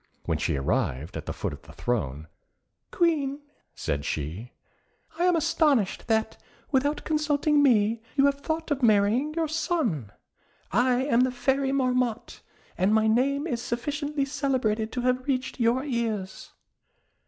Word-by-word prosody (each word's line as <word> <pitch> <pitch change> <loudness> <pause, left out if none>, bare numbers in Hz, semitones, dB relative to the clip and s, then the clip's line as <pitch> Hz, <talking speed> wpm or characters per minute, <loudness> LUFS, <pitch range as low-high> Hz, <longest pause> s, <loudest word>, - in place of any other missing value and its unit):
When - - -1
she - - 0
arrived 70 +2 -1
at - - -6
the - - -2
foot - - -4
of - - -10
the - - -15
throne, 80 - -2 0.6
"Queen" 295 -5 +1 0.4
said 70 0 -2
she, 80 - -4 0.7
"I 350 - +3
am 360 -1 +4
astonished 290 - +1
that, 220 -1 0 0.3
without 285 +2 +1
consulting 300 -1 +2
me, 225 -4 +3
you 275 -1 +4
have 280 0 +2
thought 315 +2 -3
of 280 -1 0
marrying 230 +7 +3
your 330 -1 0
son. 300 - -1 0.6
I 250 +1 +2
am 250 -4 +3
the 255 - +3
Fairy 265 +2 0
Marmotte, 250 -4 -1 0.4
and 195 +4 +3
my 220 0 +3
name 270 +6 +2
is 245 -8 -2
sufficiently 285 +4 -2
celebrated 260 -6 -1
to 250 - -2
have 255 +1 0
reached 260 -1 -2
your 240 +3 +2
ears." 225 -8 -3
255 Hz, 145 wpm, -26 LUFS, 220-285 Hz, 0.7 s, am